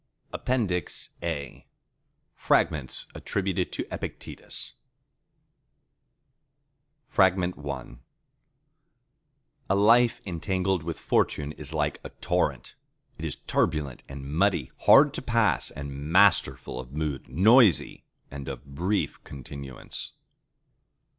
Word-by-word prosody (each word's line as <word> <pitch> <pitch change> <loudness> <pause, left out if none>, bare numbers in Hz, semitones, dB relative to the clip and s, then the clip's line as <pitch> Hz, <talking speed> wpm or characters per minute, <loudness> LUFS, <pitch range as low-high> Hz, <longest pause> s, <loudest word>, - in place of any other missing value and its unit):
(APPENDIX 105 -9 -1
A) 75 -6 -5 0.7
Fragments 70 -4 +1
Attributed 95 -2 -2
to - - -4
Epictetus - - -7 2.5
I 95 - +9 2.4
A 95 - +3
life 115 +4 +5
entangled 95 0 -1
with 85 +1 -4
Fortune 75 0 0
is 75 -2 -10
like 75 -2 -1
a - - -7
torrent. - - -1 0.5
It - - -4
is - - -3
turbulent 75 -6 0
and 70 0 -8
muddy; 80 -1 +1 0.2
hard 145 0 +8
to - - -4
pass 115 - +2
and 70 +2 -7
masterful 95 -8 +3
of 65 +1 -9
mood: 75 -4 -3
noisy 105 - +4 0.3
and 70 0 -7
of 70 0 -6
brief 90 +9 -2
continuance. 70 -1 -8
80 Hz, 95 wpm, -27 LUFS, 70-100 Hz, 2.5 s, I